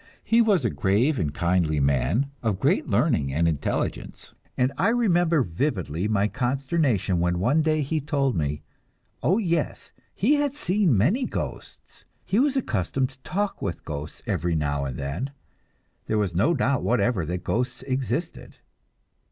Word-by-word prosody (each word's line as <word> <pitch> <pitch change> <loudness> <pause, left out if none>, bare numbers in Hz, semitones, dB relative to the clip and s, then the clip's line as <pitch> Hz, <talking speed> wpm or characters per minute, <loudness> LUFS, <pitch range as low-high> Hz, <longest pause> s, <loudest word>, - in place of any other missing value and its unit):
He 230 +1 +4
was 200 - +3
a 115 - +1
grave 115 +9 +1
and 75 -5 0
kindly 85 -1 +1
man, 70 - +1
of 110 -5 -1
great - - +1
learning 70 -1 +1
and 80 +5 +1
intelligence, 80 -4 -3 0.2
and 130 +2 +1
I 170 +8 +1
remember 175 - +3
vividly 90 - -2
my 105 -1 +2
consternation 130 - 0
when 90 0 +1
one 125 - +2
day 155 -1 +1
he 155 +3 -1
told 140 -3 0
me 75 -2 -2 0.6
oh, 170 +11 +3
yes, 170 -8 -1 0.2
he 280 +9 +3
had 290 -1 0
seen 195 - +2
many 190 - +2
ghosts, - - -7 0.2
he 205 - +1
was 275 +1 +2
accustomed 130 - -1
to 135 - -22
talk 200 +9 -3
with - - -4
ghosts 75 0 -6
every 85 -1 -1
now 70 -2 -1
and 65 -3 -5
then. 70 - -3 0.8
There 110 - 0
was 100 -5 0
no 115 - +2
doubt 135 -1 +1
whatever 120 -5 +1
that 90 +2 -3
ghosts 125 +2 -2
existed! 135 +5 -3
125 Hz, 155 wpm, -25 LUFS, -, 0.8 s, He